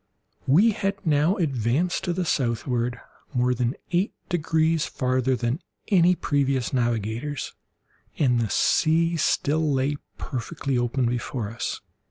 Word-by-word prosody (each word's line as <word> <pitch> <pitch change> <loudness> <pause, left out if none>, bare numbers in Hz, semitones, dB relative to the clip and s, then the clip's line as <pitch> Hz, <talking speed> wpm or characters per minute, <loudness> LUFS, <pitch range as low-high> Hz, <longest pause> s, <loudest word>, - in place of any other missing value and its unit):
We 190 +12 +5
had 195 -1 -1
now 155 +4 +3
advanced 145 - 0
to 175 - 0
the 180 +1 -1
southward 120 -3 -1 0.4
more 125 0 +2
than 125 +1 -1 0.2
eight 180 +3 +1 0.2
degrees 160 -2 +1
farther 130 0 0
than 120 +4 -1 0.3
any 180 -2 +5
previous 140 -5 0
navigators, 120 +3 -1 0.6
and 125 -5 +3
the 115 -2 0
sea 165 +1 +2
still 155 0 +1
lay 140 +2 0 0.2
perfectly 140 +1 -3
open 120 +1 +1
before 120 -2 -2
us. 115 - -4
135 Hz, 125 wpm, -25 LUFS, 120-165 Hz, 0.6 s, We